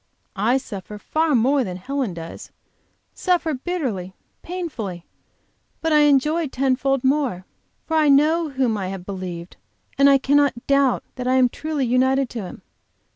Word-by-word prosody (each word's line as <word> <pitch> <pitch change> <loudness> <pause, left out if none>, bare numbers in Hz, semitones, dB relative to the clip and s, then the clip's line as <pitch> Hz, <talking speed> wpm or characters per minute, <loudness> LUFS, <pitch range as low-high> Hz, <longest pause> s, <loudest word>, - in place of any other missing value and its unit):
I 220 +6 +2
suffer 210 -4 -7
far 310 +7 0
more 260 +4 +3
than 180 -5 -5
Helen 255 -1 -3
does, 165 0 -9 0.6
suffer 350 -4 0
bitterly, 255 - -3 0.3
painfully, 245 - -5 0.7
but 325 -1 0
I 300 - +6
enjoy 300 +3 +2
ten 265 0 +1
fold 270 0 0
more. 260 -9 0 0.4
For 320 - 0
I 305 -2 +4
know 310 +4 +4
whom 260 -5 0
I 190 - -3
have 190 -1 -6
believed, 185 -3 -7 0.4
and 280 0 +7
I 275 - +6
cannot 275 -2 +1
doubt 275 -2 +2
that 250 0 -3
I 255 - +3
am 255 -1 +4
truly 305 0 -3
united 260 +2 +2
to 235 - -4
Him. 185 - -9
265 Hz, 155 wpm, -22 LUFS, 210-290 Hz, 0.7 s, and